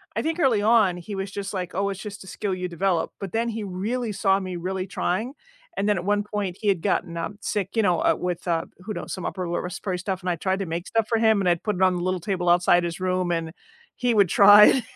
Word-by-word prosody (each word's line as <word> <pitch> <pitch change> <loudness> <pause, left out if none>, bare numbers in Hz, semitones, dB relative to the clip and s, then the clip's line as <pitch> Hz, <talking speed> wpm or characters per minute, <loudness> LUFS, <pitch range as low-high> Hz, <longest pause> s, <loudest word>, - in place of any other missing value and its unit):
I - - 0
think 325 +2 -2
early 240 -7 +3
on 210 -5 +4
he 195 +4 -7
was 195 0 -4
just, 200 0 -5
like, 180 -2 -4
"Oh, 200 +2 0
it's 195 0 -5
just 205 -2 -8
a - - -14
skill 200 -1 -3
you 180 0 -3
develop," 175 0 0
but 195 -3 -6
then 230 +1 0
he 220 -1 -4
really 215 +5 -3
saw 195 -1 +2
me 185 -2 -5
really 185 +2 -3
trying, 220 +13 -2 0.4
and 200 - 0
then 205 - +2
at 175 - -3
one 205 +1 +1
point 200 -4 -3
he 210 - -4
had 190 -5 +2
gotten, 175 -4 -1
um, 195 +5 -4
sick, 200 -3 -2
you 225 - +5
know, 180 -5 +2
uh, - - +3
with, 180 -1 -3
uh, 165 -1 0
who 210 +4 -6
knows, - - -6
some 185 - -5
upper 185 -2 -3
lower 175 - -2
respiratory 180 +1 -4
stuff, 185 0 -3
and 180 - -3
I 175 - +1
tried 190 +2 -1
to 195 - -2
make 170 +2 -4
stuff 225 -1 +1
for 230 - +1
him, 220 -2 +3
and 190 - 0
I'd 175 -1 0
put 210 -3 -1
it 190 - -4
on 185 -1 +4
the 175 - -3
little 185 0 -1
table 180 -1 -1
outside 175 0 +4
his 170 +2 -4
room 185 -1 0
and 165 -1 -2 0.4
he 245 -1 +1
would 200 -3 +4
try, 210 +5 +8
190 Hz, 275 wpm, -24 LUFS, 180-210 Hz, 0.4 s, try